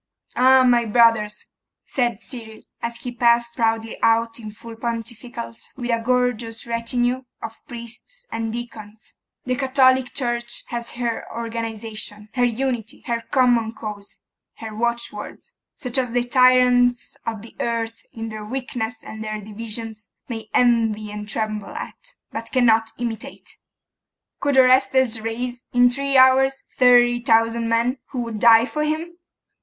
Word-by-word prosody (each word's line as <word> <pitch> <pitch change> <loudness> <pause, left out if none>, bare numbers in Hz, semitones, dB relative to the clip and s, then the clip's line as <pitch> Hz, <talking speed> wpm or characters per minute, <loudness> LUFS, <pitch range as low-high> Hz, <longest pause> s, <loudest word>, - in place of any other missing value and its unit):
'Ay, 260 +1 +6
my 240 -2 +4
brothers!' 225 -2 +3 0.4
said 240 -4 -1
Cyril, 225 -4 -9 0.2
as 235 0 -3
he 245 - -6
passed 235 -1 +2
proudly 225 -1 -1
out 230 +1 +2
in 215 -2 -7
full 225 +2 -11
pontificals, 235 0 -6
with 245 -2 -2
a 230 0 +1
gorgeous 245 -2 0
retinue 240 +2 -1 0.2
of 225 - -8
priests 240 - -10
and 225 -1 -2
deacons 220 -2 -9 0.3
'the 255 0 -1
Catholic 260 -1 +3
Church 240 -2 -1
has 235 0 -4
her 235 -1 -2
organisation, 225 -2 -5
her 245 - +1
unity, 240 -2 -2
her 235 -1 -1
common 240 -4 +3
cause, 210 -2 -8 0.4
her 220 -1 -8
watchwords, 235 -2 -3 0.3
such 250 0 0
as 250 -3 -1
the 245 0 +2
tyrants 250 -1 +4
of 220 -2 -3
the 230 - -13
earth, 230 -1 -2
in 225 0 -6
their 215 -1 -7
weakness 245 -1 -4
and 220 0 -8
their 215 0 -4
divisions, 215 0 -7 0.2
may 225 -3 -6
envy 225 -3 +2
and 210 0 -7
tremble 215 -2 -3
at, - - -9 0.2
but 230 0 -6
cannot 225 -3 +3
imitate. 235 -2 -6 0.8
Could 280 -1 +1
Orestes 260 -2 +4
raise, 240 +2 -4
in 245 0 +5
three 275 +1 +1
hours, 265 +1 +5
thirty 245 -1 +5
thousand 230 0 +2
men, 235 +3 +1
who 250 -2 -3
would 230 -2 -5
die 230 +1 +7
for 300 +3 -2
him? 320 +3 -3
235 Hz, 140 wpm, -22 LUFS, 225-250 Hz, 0.8 s, die